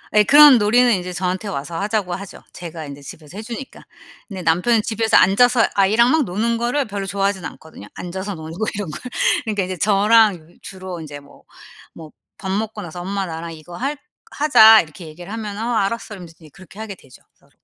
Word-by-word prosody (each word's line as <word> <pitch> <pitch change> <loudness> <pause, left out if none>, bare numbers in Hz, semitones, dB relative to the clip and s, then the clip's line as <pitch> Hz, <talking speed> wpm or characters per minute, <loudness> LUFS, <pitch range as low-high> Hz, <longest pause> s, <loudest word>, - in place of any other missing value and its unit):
예. 210 - +6
그런 290 +3 +8
놀이는 240 +3 +3
인제 180 -2 -3
저한테 185 +3 -3
와서 165 -2 -5
하자고 205 -3 -2
하죠. 195 0 -10
제가 165 -2 -8
인제 140 0 -10
집에서 155 +5 -12
해 - - -5
주니까. 240 +3 -9 0.5
근데 195 -3 -7
남편은 180 +8 +2
집에서 225 0 +1
앉아서 240 +5 +4
아이랑 215 +5 +3
막 315 0 +3
노는 230 +5 -1
거를 245 +4 -1
별로 200 -2 -5
좋아하진 195 0 -2
않거든요. 145 -8 -11
앉아서 190 +3 -6
노는 160 0 -9
거 220 - -1
이런 200 -4 -4
걸. 150 - -8 0.4
그러니까 210 -3 -1
이제 185 0 -5
저랑 200 -3 +2
주로 185 -2 -8
인제 145 -2 -9
뭐, 140 - -19 0.5
뭐 160 -2 -12 0.3
밥 190 - -6
먹고 210 +1 -3
나서 175 0 -8
"엄마 195 +2 -3
나랑 165 -1 -7
이거 160 +2 -12
할 275 +8 -3 0.3
하자." 225 -7 +6
이렇게 160 +1 -12
얘기를 175 +6 -10
하면은 215 -1 -5
어 240 - -2
"알았어." 220 +1 -2
이러면서 175 -4 -11 0.2
그렇게 185 +1 -16
하게 220 -2 -6
되죠 135 -9 -18
서로. - - -31
195 Hz, 410 characters per minute, -20 LUFS, 175-220 Hz, 0.5 s, 그런